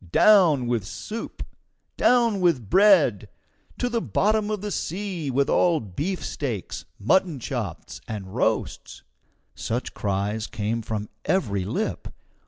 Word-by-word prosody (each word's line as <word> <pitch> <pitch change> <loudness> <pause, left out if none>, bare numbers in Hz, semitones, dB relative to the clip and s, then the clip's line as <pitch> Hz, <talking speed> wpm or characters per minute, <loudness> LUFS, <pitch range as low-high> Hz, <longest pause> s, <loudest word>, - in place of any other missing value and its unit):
Down 175 - +5
with 120 -3 0
soup! 215 - -7 0.5
Down 235 -5 +3
with 135 - +1
bread! 185 - +5 0.5
To 245 - 0
the 235 -1 -1
bottom 215 0 +1
of 210 -2 -2
the 210 0 -4
sea 180 -3 -3
with 135 +2 +1
all 170 -3 +3
beefsteaks, 130 - -4
mutton 160 - +2
chops, 115 - -5
and 100 -3 -6
roasts!" - - -2 0.5
Such 120 +3 -3
cries 105 +2 -2
came 110 +2 -2
from 105 -1 -4
every 100 - 0
lip. 100 - -3
140 Hz, 120 wpm, -24 LUFS, -, 0.5 s, Down